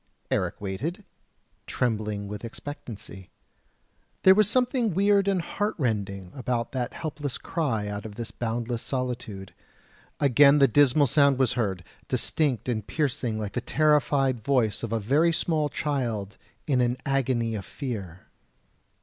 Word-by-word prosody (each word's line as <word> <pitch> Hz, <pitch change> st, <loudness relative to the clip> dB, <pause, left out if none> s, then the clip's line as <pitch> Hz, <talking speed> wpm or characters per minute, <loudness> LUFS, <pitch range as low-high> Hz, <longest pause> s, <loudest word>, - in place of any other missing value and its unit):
Eric -, -, 0 dB
waited, 115 Hz, -, -4 dB, 0.6 s
trembling 105 Hz, -4 st, -1 dB
with 105 Hz, +1 st, -7 dB
expectancy; 115 Hz, -6 st, -8 dB, 0.9 s
there 190 Hz, -, +9 dB
was 210 Hz, +1 st, +4 dB
something 245 Hz, -, +1 dB
weird 200 Hz, 0 st, +3 dB
and 190 Hz, -3 st, +1 dB
heartrending 105 Hz, -, -2 dB
about 120 Hz, -2 st, -2 dB
that 125 Hz, -2 st, -3 dB
helpless 150 Hz, -4 st, -4 dB
cry 125 Hz, -11 st, -2 dB
out 105 Hz, 0 st, -4 dB
of 105 Hz, -2 st, -8 dB
this 115 Hz, -1 st, -6 dB
boundless 120 Hz, 0 st, -3 dB
solitude; 120 Hz, -7 st, -4 dB, 0.7 s
again 140 Hz, +1 st, +6 dB
the 140 Hz, -1 st, +6 dB
dismal 145 Hz, +3 st, +4 dB
sound 140 Hz, 0 st, +4 dB
was 130 Hz, -2 st, +2 dB
heard, 100 Hz, -7 st, -1 dB, 0.2 s
distinct 135 Hz, -9 st, 0 dB
and 110 Hz, -4 st, -2 dB
piercing 125 Hz, -7 st, -1 dB
like 105 Hz, -2 st, -3 dB
the 125 Hz, -, -1 dB
terrified 140 Hz, -3 st, +2 dB
voice 115 Hz, -4 st, +1 dB
of 115 Hz, -, -4 dB
a 115 Hz, -, +1 dB
very 145 Hz, +11 st, +3 dB
small 160 Hz, -2 st, 0 dB
child 120 Hz, -10 st, -2 dB, 0.3 s
in 130 Hz, -4 st, +2 dB
an 120 Hz, +1 st, +1 dB
agony 130 Hz, -4 st, 0 dB
of 105 Hz, -3 st, -4 dB
fear. 100 Hz, -, -6 dB
125 Hz, 135 wpm, -26 LUFS, 110-145 Hz, 0.9 s, there